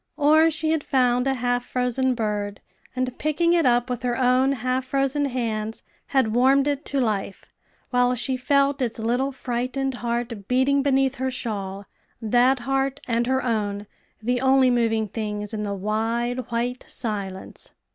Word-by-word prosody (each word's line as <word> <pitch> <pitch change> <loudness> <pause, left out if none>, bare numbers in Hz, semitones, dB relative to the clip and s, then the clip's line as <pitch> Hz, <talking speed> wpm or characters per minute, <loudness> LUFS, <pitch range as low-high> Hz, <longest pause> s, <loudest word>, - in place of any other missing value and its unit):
Or 310 +2 +5
she 315 0 -1
had 320 -2 0
found 250 -1 +2
a 270 - +1
half 245 0 0
frozen 250 +1 0
bird, 210 -3 -2 0.4
and, 255 -1 -2
picking 335 +3 +2
it 335 -5 +3
up 245 0 +3
with 250 -2 -3
her 245 -1 -1
own 255 +1 +3
half 255 +1 -1
frozen 275 +2 0
hands, 225 -4 -3 0.2
had 260 -6 +1
warmed 270 +3 +4
it 285 0 -1
to 280 - -1
life, 210 -5 -2 0.5
while 250 0 +3
she 245 +2 -1
felt 275 +2 +1
its 235 -3 -1
little 245 +5 0
frightened 260 +1 -2
heart 235 -4 -3
beating 265 +2 +3
beneath 270 -1 +2
her 260 +1 -1
shawl 200 -5 -4 0.3
that 245 +3 +3
heart 270 +2 -1
and 235 0 0
her 260 0 +1
own 210 -4 -1 0.4
the 245 +2 0
only 265 -1 +4
moving 225 -2 +1
things 210 0 -4
in 215 - -3
the 200 -1 -2
wide, 230 +5 -2
white 245 +2 -2
silence. 200 -4 -6
250 Hz, 160 wpm, -24 LUFS, 225-270 Hz, 0.5 s, Or